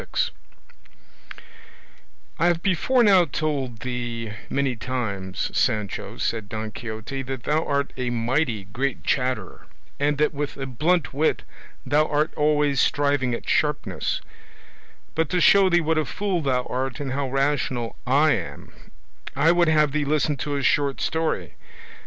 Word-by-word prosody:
"I 170 - +4
have 170 -1 +1
before 235 +7 +3
now 190 -5 +6
told 140 -6 -2
thee 120 -3 -4 0.2
many 140 -2 0
times, 105 -6 -3
Sancho," 105 -5 -1
said 110 -3 -2
Don 110 0 -4
Quixote, 110 +5 -5
"that 130 -2 -5
thou 155 +2 +1
art 140 0 -1
a 125 -1 -2
mighty 120 -1 0
great 120 +6 -3
chatterer, 125 -8 -1 0.3
and 145 0 +1
that 150 +2 +2
with 145 0 -4
a 135 - -4
blunt 155 +6 0
wit 155 +4 +1 0.4
thou 150 +3 +3
art 150 +3 0
always 150 -2 +2
striving 140 -4 +1
at - - -9
sharpness; 150 -1 0 0.9
but 160 -1 0
to 180 - +1
show 195 +2 +6
thee 175 -1 +4
what 160 0 +1
a 155 - 0
fool 190 +2 -1
thou 130 -3 +1
art 130 0 -3
and 140 -2 -3
how 135 0 -1
rational 135 -3 0
I 145 +4 +4
am, 100 -9 -4 0.6
I 165 - +4
would 175 0 +3
have 155 -2 +4
thee 150 +1 0
listen 150 +1 +1
to 145 +2 -3
a 140 - -2
short 140 -1 +2
story. 160 - -1
140 Hz, 145 wpm, -24 LUFS, 125-155 Hz, 0.9 s, now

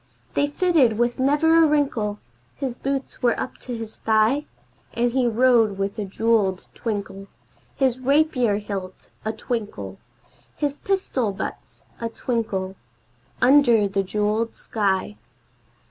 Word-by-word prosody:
They 285 - +2
fitted 290 - +3
with 240 +2 0
never 320 +5 +4
a - - +5
wrinkle; 270 -9 0 0.4
his 265 -4 -3
boots 270 +1 -4
were 240 -2 +2
up - - -5
to 245 -2 -5
his 225 -1 -8
thigh! 225 +7 +2 0.5
And 240 +1 +1
he 255 0 +2
rode 230 -3 +3
with 200 +2 -2
a 210 - -2
jeweled 200 -2 +1
twinkle 195 -3 -4 0.5
His 260 -2 +1
rapier 260 -4 +2
hilt 195 -3 -6
a 220 - -1
twinkle 210 - -5 0.6
His 290 -1 -2
pistol 325 - 0
butts - - -7 0.2
a 230 - -2
twinkle, 210 -6 -2 0.7
under 245 -6 +5
the 195 0 0
jeweled 210 +3 -1
sky. 205 -1 -1
230 Hz, 130 wpm, -23 LUFS, 205-265 Hz, 0.7 s, a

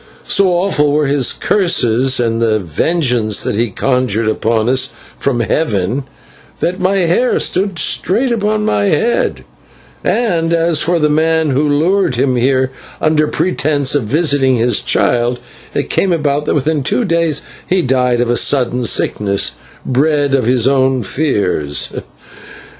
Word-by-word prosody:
So 195 -1 +2
awful 175 -5 +1
were 150 +1 +1
his 140 -2 +1
curses 130 - +1
and 115 -1 0
the 110 -2 +2
vengeance 110 - 0
that - - -2
he 115 +2 0
conjured 120 -1 0
upon 110 0 0
us 130 +1 +2 0.3
from 125 -4 0
heaven, 115 - -1 0.5
that 180 +2 -2
my 185 0 +1
hair 210 +10 +1
stood 195 -1 0
straight 225 - +1
upon 215 -1 0
my 105 -1 +1
head, 225 - 0 0.6
and 170 -8 0
as 165 -2 +1
for 175 +1 +1
the 150 -2 +2
man 160 0 +1
who 145 +3 +1
lured 165 +1 +1
him 130 +1 +1
here 130 +1 +1 0.3
under 155 -1 +2
pretence 145 -6 0
of 145 -6 0
visiting 140 0 +1
his 120 -1 +1
child, 120 0 +1 0.4
it - - -2
came 195 - +1
about 150 -3 0
that - - 0
within 150 +1 0
two 180 - 0
days 165 -4 0 0.2
he 185 -1 +1
died 125 -2 +1
of 120 - -1
a 120 - +1
sudden 125 -2 +1
sickness 100 -3 0 0.3
bred 145 +1 +1
of 130 -4 +1
his 125 -1 +2
own 130 -2 +2
fears. 100 - -1
140 Hz, 145 wpm, -14 LUFS, 120-165 Hz, 0.6 s, So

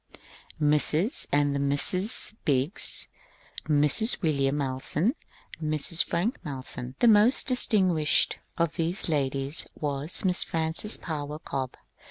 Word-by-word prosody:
Mrs. 150 - +1
and 145 0 +1
the 140 - -2
Misses 180 - 0
Biggs, 140 +6 -1 0.6
Mrs. 150 - +4
William 140 -3 0
Malleson, 140 - -1 0.5
Mrs. 155 +2 +2
Frank 190 +9 -3
Malleson. 130 -2 -6
The 240 - +2
most 220 +3 +4
distinguished 185 - +3 0.2
of 170 -1 -1
these 170 +4 0
ladies 140 0 0
was 145 +5 -3
Miss 180 -1 +1
Frances 165 +6 +1
Power 150 -2 -6
Cobbe. 135 -4 -6
155 Hz, 110 wpm, -26 LUFS, 140-180 Hz, 0.6 s, Mrs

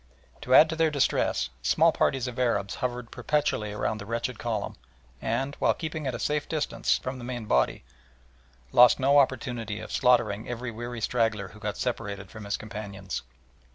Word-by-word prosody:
To 130 - +3
add 155 - +9
to - - -2
their 160 0 +3
distress, 125 - +1
small - - +4
parties 130 -2 +1
of 125 0 -6
Arabs 110 -6 +1
hovered 125 -2 -3
perpetually 145 -8 0
around 105 +1 -2
the 100 - -8
wretched 115 +1 -3
column 110 -3 -3 0.5
and, 135 +5 -1
while - - +3
keeping 155 -3 -4
at 130 - -2
a - - -3
safe 150 0 -1
distance 155 -2 0
from 130 0 -5
the - - -8
main 120 -2 -5
body, 65 -11 +1 0.9
lost 125 0 +7
no 140 +2 +5
opportunity 120 -5 -1
of 110 - -8
slaughtering 120 -4 +2
every 120 0 -4
weary 120 +1 -6
straggler 110 -4 0
who 110 - -14
got 105 -1 -4
separated 100 -5 -3
from 110 -2 -9
his 100 - -1
companions. 100 -3 -6
120 Hz, 175 wpm, -27 LUFS, 105-130 Hz, 0.9 s, add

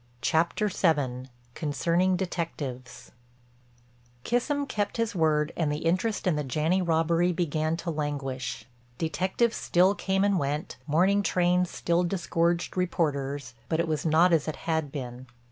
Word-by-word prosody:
CHAPTER 170 +6 +2
VII—CONCERNING 145 +2 0
DETECTIVES 145 -9 -5 1.1
Kissam 285 +4 0
kept 205 -4 -2
his 230 0 0
word 155 -3 +1
and 155 -3 0
the 150 +2 -3
interest 185 +6 0
in 180 -4 +2
the 150 - -1
Janney 155 +7 +1
robbery 170 +1 +2
began 160 -1 -1
to 170 0 -3
languish. 145 -4 -3 0.3
Detectives 185 +8 0
still 185 +3 +3
came 195 -1 0
and 200 -2 +2
went, 145 +2 -3
morning 185 +7 +3
trains 180 -2 +2
still 170 0 0
disgorged 170 -1 0
reporters, 145 -8 -1 0.2
but 160 - 0
it 170 - +1
was 155 -2 -1
not 165 +2 +4
as 160 -2 +2
it 155 - -2
had 160 -4 0
been. 125 -2 -7
165 Hz, 135 wpm, -27 LUFS, 150-180 Hz, 1.1 s, not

